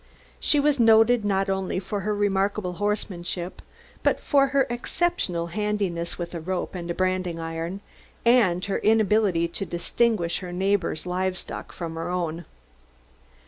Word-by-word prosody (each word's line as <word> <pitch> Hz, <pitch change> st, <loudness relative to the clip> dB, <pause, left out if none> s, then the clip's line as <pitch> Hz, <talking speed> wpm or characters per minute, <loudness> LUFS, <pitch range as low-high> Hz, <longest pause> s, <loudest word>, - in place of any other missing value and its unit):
She 295 Hz, -, +3 dB
was 285 Hz, -1 st, +2 dB
noted 225 Hz, 0 st, +5 dB
not 195 Hz, -1 st, +1 dB
only 190 Hz, -1 st, -1 dB
for 195 Hz, +2 st, -3 dB
her 210 Hz, +2 st, -1 dB
remarkable 200 Hz, -1 st, 0 dB
horsemanship, 185 Hz, -3 st, -3 dB, 0.4 s
but -, -, +2 dB
for 275 Hz, -2 st, +3 dB
her 275 Hz, -1 st, +2 dB
exceptional 240 Hz, -, -1 dB
handiness 200 Hz, -5 st, -1 dB
with 170 Hz, -1 st, -5 dB
a 170 Hz, -, -3 dB
rope 180 Hz, +3 st, -3 dB
and 170 Hz, -2 st, -4 dB
branding 185 Hz, -2 st, 0 dB
iron, 165 Hz, +4 st, -4 dB, 0.4 s
and 210 Hz, -7 st, +4 dB
her 200 Hz, -, -1 dB
inability 210 Hz, -5 st, +3 dB
to 170 Hz, -, -4 dB
distinguish 180 Hz, 0 st, 0 dB
her 180 Hz, -2 st, -7 dB
neighbors' 190 Hz, -2 st, 0 dB
livestock 185 Hz, +1 st, -3 dB
from 165 Hz, -2 st, -5 dB
her 165 Hz, +1 st, -4 dB
own. 175 Hz, -2 st, -2 dB
190 Hz, 140 wpm, -25 LUFS, 175-215 Hz, 0.4 s, noted